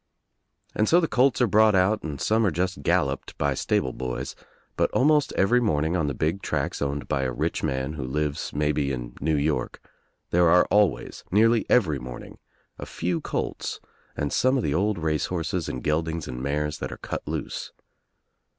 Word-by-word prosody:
And 110 - +1
so 170 - +6
the 165 - +1
colts 130 -1 +2
are 125 - +4
brought 110 0 +5
out 95 +4 +3
and 75 -3 -5
some 110 +1 +2
are 105 - +3
just 90 +3 -2
galloped - - 0
by 70 -1 +1
stable 65 -1 0
boys, 65 -1 -4 0.4
but - - +2
almost 150 +2 +3
every 115 +6 +3
morning 80 -6 +1
on 80 -5 0
a 70 - -4
big 80 +8 -1
track - - -2
owned 70 0 -2
by 70 - 0
a 65 -1 -1
rich - - -2
man 65 +2 -2
who 75 -4 -5
lives 75 +3 -2
maybe 75 -1 0
in - - -5
New 80 +2 +1
York, 75 +1 -1 0.5
there 85 -1 +4
are 90 +1 +6
always, 105 -3 +1
nearly 115 +3 +3
every 80 - +3
morning, 65 -1 -9 0.4
a - - -6
few 85 -1 -2
colts - - -3 0.4
and 75 - -2
some 130 +1 +3
of 125 - -1
the 70 - 0
old 100 +5 +1
race 80 -2 0
horses 85 -3 -2
and 65 - -5
geldings 80 +1 -1
and 65 0 -5
mares 75 +2 -2
that - - -4
are - - -7
cut - - -5
loose. - - -4
80 Hz, 185 wpm, -25 LUFS, 70-105 Hz, 0.5 s, so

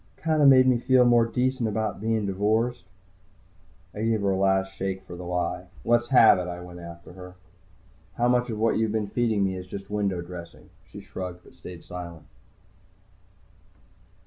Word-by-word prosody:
"Kind 155 -1 0
of 145 - +7
made 130 -1 +7
me 125 -2 +3
feel 130 0 +4
more 120 -1 +4
decent 125 0 -1
about 110 -1 -3
bein' 110 -1 0
divorced." 110 +5 0 1.1
I 105 - -6
gave 110 -1 +1
her 100 -1 +1
a - - +1
last 95 0 +1
shake 95 0 -4
for 90 -2 -10
the 90 0 -8
lie. 90 +1 -3 0.2
"Let's 120 0 +2
have 115 -7 +6
it," 90 - -4
I 90 0 -6
went 90 0 -10
after 85 0 -11
her. 90 0 -11 0.8
"How 120 - +1
much 125 0 +2
of 110 - -4
what 110 +1 +1
you've 110 -1 0
been 110 -1 -1
feeding 110 -1 0
me 95 -1 -1
is 90 0 -8
just 100 +2 -8
window 100 -3 -1
dressing?" 85 -1 -11 0.2
She - - -11
shrugged, 90 -1 -7
but - - -18
stayed 90 -2 -11
silent. 85 -3 -9
100 Hz, 180 wpm, -25 LUFS, 90-115 Hz, 1.1 s, of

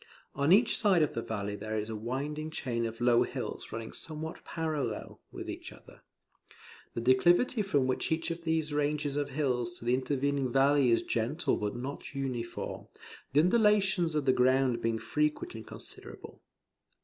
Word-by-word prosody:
On 140 +3 +1
each 225 +5 +5
side 190 -6 +4
of 150 - -1
the 115 - -2
valley 105 -2 -3
there 110 +2 -4
is 105 0 -2
a 110 - -4
winding 140 +8 -3
chain 120 -6 -2
of 115 +1 -8
low 120 -1 +5
hills - - -4
running 110 0 -5
somewhat 160 0 -6
parallel, 155 -9 -3
with - - -7
each - - -6
other. - - -16 0.9
The 115 - -2
declivity 175 - +4
from 145 -10 +1
each 160 +5 -1
of 165 +1 -5
these 160 -2 0
ranges 145 -1 0
of 145 -1 -1
hills 125 -4 -1
to - - -11
the 120 - +2
intervening 135 0 0
valley 135 0 +4
is 115 - +3
gentle 125 +10 0
but 105 +1 -3
not 135 +3 -6
uniform, 125 -4 -4 0.5
the 145 - +6
undulations 195 -4 +3
of 150 -2 0
the 130 - +4
ground 130 -1 +3
being 115 0 0
frequent 150 +5 -1
and 110 -1 -9
considerable. - - -11
140 Hz, 165 wpm, -30 LUFS, 120-155 Hz, 0.9 s, the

